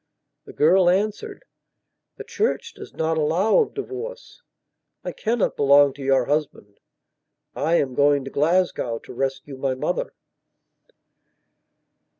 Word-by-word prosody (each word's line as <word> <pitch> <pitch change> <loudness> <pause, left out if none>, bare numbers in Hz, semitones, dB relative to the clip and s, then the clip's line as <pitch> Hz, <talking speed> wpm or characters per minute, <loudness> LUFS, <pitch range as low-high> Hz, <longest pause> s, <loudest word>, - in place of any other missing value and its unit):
The - - -12
girl 175 +4 +4
answered: 215 - -2 0.7
"The - - -7
Church 440 +3 -2
does - - -11
not 160 0 -1
allow 170 - +2
of 450 - -1
divorce. 450 +5 -7 0.6
I - - -4
cannot 230 -1 -1
belong 140 0 +5
to 140 - -12
your 135 -2 +2
husband. 145 -9 -3 0.8
I 160 +3 +1
am 135 -6 0
going 140 0 +2
to 135 - -7
Glasgow 160 -6 0
to - - -12
rescue 135 +2 -4
my 130 -1 -1
mother." - - -3
155 Hz, 125 wpm, -23 LUFS, 135-215 Hz, 0.8 s, belong